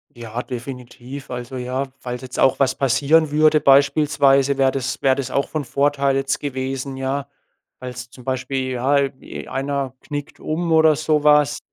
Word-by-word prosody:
Ja, 120 0 -5
definitiv. 125 +1 -8
Also, 125 +1 -6
ja, 130 +2 -2
falls 125 0 -6
jetzt 130 -1 -7
auch 135 - +3
was 135 -1 +2
passieren 140 +4 +3
würde 155 0 +4
beispielsweise, 140 -1 +4
wär 135 -1 +3
das 135 -1 -3
wär 135 -1 +3
das 135 -2 -4
auch 140 - 0
von 155 -3 -3
Vorteil 140 0 +1
jetzt 135 0 -1
gewesen, 135 -1 -4
ja. 135 +1 -2 0.5
Falls 125 -1 -7
zum 125 0 -15
Beispiel, 130 0 -2
ja, 130 +3 +1
äh, 140 -1 +1
i - - -8
einer 135 -1 -3
knickt 145 -1 -7
um 165 +2 -2
oder 160 -1 +5
so 155 0 0
was. 150 -1 +4
135 Hz, 170 wpm, -21 LUFS, 130-145 Hz, 0.5 s, oder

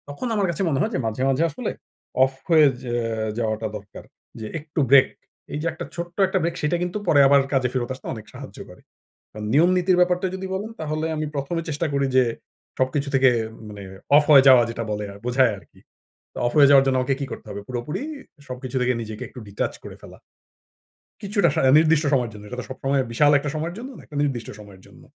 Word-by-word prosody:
তখন 145 - -5
আমার 200 -2 +1
কাছে 170 +2 -3
মনে 135 -3 0
হয় 220 - 0
যে - - 0
মাঝে, 110 +3 -3
মাঝে 135 +4 +2
আসলে 150 - -4 0.5
অফ 135 0 +1 0.2
হয়ে 160 -2 +6 0.2
যে 120 - -5 0.5
যাওয়াটা 110 -1 -1
দরকার। 100 -1 -13 0.4
যে 110 - -6
একটু 155 +1 -6
ব্রেক 135 0 +7 0.5
এই 150 - -2
যে - - -5
একটা 160 - -7
ছোট্ট 170 0 -6
একটা 190 0 0
ব্রেক 170 0 -1
সেটা 150 +3 +1
কিন্তু 180 +3 -3
পরে 145 - +5
আবার 140 0 +6
কাজে 130 -2 +2
ফেরত 125 -2 -2
আসতে 130 - -14
অনেক 110 -3 -9
সাহায্য - - -10
করে। - - -15 0.5
কারণ 105 0 -7
নিয়ম 165 +6 +5
নীতির 180 0 +2
ব্যাপারটা 180 +1 +2
যদি 190 0 -5
বলেন 205 +4 -4
তাহলে 155 0 -2
আমি 155 0 -2
১ম 140 +4 -3
এ - - -7
চেষ্টা 150 +3 -1
করি 140 0 +1
যে 130 - +6 0.5
সবকিছু 140 +2 0
থেকে 135 0 +5 0.4
মানে 105 -1 -9 0.3
অফ 150 - +7
হয়ে 140 -2 +8
যাওয়া 130 -2 +8
যেটা 115 0 -4
বলে 105 0 -3 0.2
বোঝায় 125 -1 +3
আরকি। - - -19 0.6
তো - - -12
অফ 120 - +1
হয়ে 140 -2 +7
যাওয়ার 140 -1 +7
জন্য 130 -1 +2
আমাকে 135 +1 0
কি 140 - -2
করতে - - -8
হবে 100 - -6
পুরোপুরি 125 - -4 0.5
সবকিছু 130 0 -7
থেকে 125 0 +2
নিজেকে 110 -1 -7
একটু 125 - -12
ডিটাচ 100 - -3
করে - - -9
ফেলা। - - -13 1.0
কিছুটা 200 -3 +1
সারা 130 - +3
নির্দিষ্ট 160 -1 +3
সময়ের 125 -4 +1
জন্য, 105 -1 -11
এটা 125 - -7
তো - - -9
সবসময় 135 +1 -1
বিশাল 145 +5 +4
একটা 150 - -4
সময়ের 165 +3 -3
জন্য 250 +4 -7
না - - -12
একটা 145 - -9
নির্দিষ্ট 125 -6 -2
সময়ের 100 -3 -14
জন্য। - - -18
140 Hz, 215 wpm, -23 LUFS, 125-160 Hz, 1.0 s, হয়ে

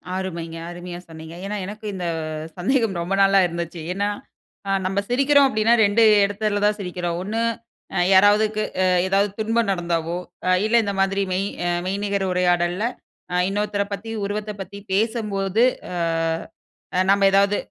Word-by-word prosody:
அருமைங்க. 170 -3 -4
அருமையா 175 0 -7
சொன்னீங்க. 160 +1 -10
ஏன்னா, 210 - -3
எனக்கு 210 +2 -8
இந்த 180 - -4 0.5
சந்தேகம் 220 -1 +1
ரொம்ப 175 +3 -2
நாளா 195 0 +5
இருந்துச்சு. 170 0 -5
ஏன்னா 200 +2 -1 0.6
அ - - +1
நம்ம 195 +1 0
சிரிக்கிறோம் 275 +2 +4
அப்படின்னா, 225 -1 +2
2 205 +3 +2 0.2
இடத்துல 205 0 -1
தான் 210 0 +2
சிரிக்கிறோம். 180 -2 -3
ஒண்ணு 215 +4 -2 0.5
அ - - +1
யாராவதுக்கு 210 +2 +4 0.2
அ - - +3 0.2
எதாவது 200 +2 +2
துன்பம் 225 0 +1
நடந்தாவோ 170 -2 -1 0.3
அ - - +3 0.2
இல்ல 220 +2 +1
இந்த 200 - -2
மாதிரி 195 +1 +1
மெய் 190 +2 0 0.4
மெய்நிகர் 200 0 -1
உரையாடல்ல 180 +1 +1 0.5
அ 180 - -1
இன்னொருத்தர 205 0 -1
பத்தி 225 +3 -6 0.2
உருவத்த 210 +1 -3
பத்தி 195 +2 -8 0.2
பேசும்போது 210 -1 0 0.3
அ 180 - -4 1.1
நம்ம 200 0 +4
ஏதாவது 200 +1 +3
200 Hz, 140 wpm, -22 LUFS, 180-210 Hz, 1.1 s, நாளா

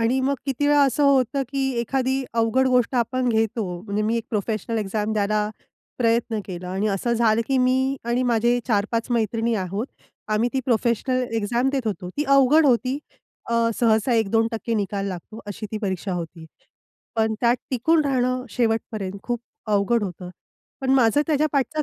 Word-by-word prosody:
आणि 245 +4 +2
मग 275 +2 +1
किती 275 +2 0
वेळा 290 -1 +5
असं 275 +2 +1
होतं 270 -1 +3
की 270 -1 -1
एखादी 265 +2 -1
अवघड 230 +3 +2
गोष्ट 250 0 +2
आपण 250 +1 0
घेतो 220 -1 +1 0.2
म्हणजे 210 0 -2
मी 225 +2 +1
एक 230 - -2
प्रोफेशनल 220 +1 -2
एक्झाम 210 +1 -2
द्यायला 210 0 +1 0.5
प्रयत्न 230 -1 +1
केला 180 -1 -6
आणि 195 +3 -1
असं 205 +4 -1
झालं 230 -1 +3
की 270 - +2
मी 260 +2 +2
आणि 240 +2 0
माझे 240 0 +2
4-5 230 +2 0
मैत्रिणी 230 0 0
आहोत. 195 +3 -2 0.4
आम्ही 215 +3 +1
ती 265 - 0
प्रोफेशनल 245 +1 +1
एक्झाम 235 +4 0
देत 270 -4 -2
होतो 200 -4 -3
ती 295 - 0
अवघड 275 +2 +5
होती. 255 +2 +2 0.5
अ, - - +1 0.3
सहसा 225 +1 +3
1%-2% 225 +1 0
निकाल 200 -1 -2
लागतो 195 +4 -8
अशी 205 +1 -6
ती 215 - -2
परीक्षा 190 -1 -2
होती. 165 -1 -6 0.7
पण 220 0 +1
त्यात 240 0 +3
टिकून 305 +5 +2
राहणं 255 -2 0
शेवटपर्यंत 225 -4 -1
खूप 240 -1 -3 0.3
अवघड 210 +2 +2
होतं. 180 -1 -7 0.5
पण 265 - -1
माझं 250 +2 +4
त्याच्या 305 -1 +2
पाठच 300 +2 0
230 Hz, 165 wpm, -23 LUFS, 215-255 Hz, 0.7 s, वेळा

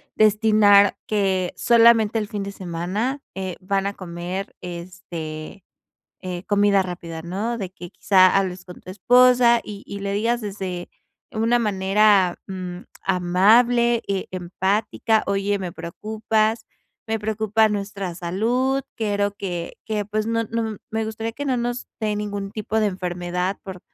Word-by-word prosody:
destinar 210 -1 +5
que 190 -4 0
solamente 230 -2 +5
el 210 - -3
fin 205 -1 -4
de 200 - -5
semana, 195 +9 -3
eh, 190 -2 -4
van 195 +1 -1
a 200 - -3
comer, 180 +1 -6
este, 170 -1 -7 0.6
eh, 180 -2 -5
comida 205 -1 +3
rápida, 170 -3 -7
¿no?, 200 +8 -3
de 190 -4 -4
que, 175 -2 -10
quizá, 185 -2 +4
hables 185 -2 -1
con 180 -1 -12
tu 185 - -10
esposa 245 +3 +5
y 205 -1 -8
y 200 0 -6
le 200 0 -2
digas, 230 +4 0
desde 190 -4 -5 0.4
una 225 +2 +2
manera, 195 -2 +3
mm, 185 -2 -5 0.3
amable, 225 +7 +4
eh, 195 -1 -1
empática: 195 +4 0
"Oye, 200 +1 0
me 185 -3 -5
preocupas. 215 +6 -1 0.4
Me 225 0 -1
preocupa 220 0 +1
nuestra 200 -3 -4
salud. 235 +10 0
Quiero 205 -2 0
que 175 -4 -4
que, 210 -1 -2
pues, 215 +1 -2
no 230 0 0
no 225 +1 -2
m 215 -2 -6
Me 220 0 -1
gustaría 220 +1 -4
que 285 +5 -5
no 265 -3 0
nos 240 +1 -3
dé 210 -1 0
ningún 205 -1 -4
tipo 215 +1 -2
de 215 - +3
enfermedad 180 0 -2
por 190 -3 -8
200 Hz, 150 wpm, -23 LUFS, 185-220 Hz, 0.6 s, destinar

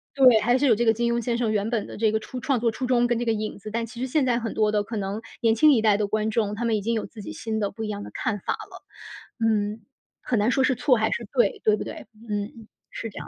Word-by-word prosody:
对， 255 -5 +7
还 245 +3 +3
是 285 - +1
有 245 - +6
这 235 - 0
个 225 - +6
金 235 +1 0
庸 235 -1 -1
先 235 0 0
生 235 -3 0
原 210 +1 0
本 230 -4 -1
的 - - -9
这 220 -1 +2
个 220 - +1
初 250 +3 -7
创 265 -2 0
作 230 -1 +1
初 250 +3 -4
衷， 245 -1 +3
跟 240 -1 0
这 240 - -2
个 230 - +2
影 215 -1 -4
子， 215 - -8
但 230 0 -1
其 235 +1 -11
实 260 - -1
现 280 +1 +1
在 245 -2 +2
很 225 -2 -4
多 215 -1 +2
的 210 -1 +2
可 220 +1 -5
能 200 +2 -3 0.2
年 225 -1 +4
轻 300 +6 +6
一 225 - +3
代 210 -2 +4
的 210 -1 0
观 215 +1 0
众， 210 -2 0
他 235 - -3
们 230 -1 +2
已 205 - -3
经 230 +3 -1
有 220 - -2
自 215 - -11
己 - - -7
新 220 -2 -3
的 200 -1 0
不 220 +2 -6
一 - - -3
样 205 -1 -4
的 - - -8
看 210 -2 -2
法 - - -2
了。 - - -10 0.6
嗯， 215 -1 0 0.4
很 235 - 0
难 210 +4 +2
说 265 +2 +2
是 260 - +3
错 250 0 +3
还 220 0 +1
是 235 - -3
对， 240 -6 +2
对 215 - +4
不 - - -4
对？ - - -8 0.2
嗯， 210 +2 -4 0.2
是 225 - -5
这 - - -14
样 - - -8
225 Hz, 335 characters per minute, -25 LUFS, 215-240 Hz, 0.6 s, 对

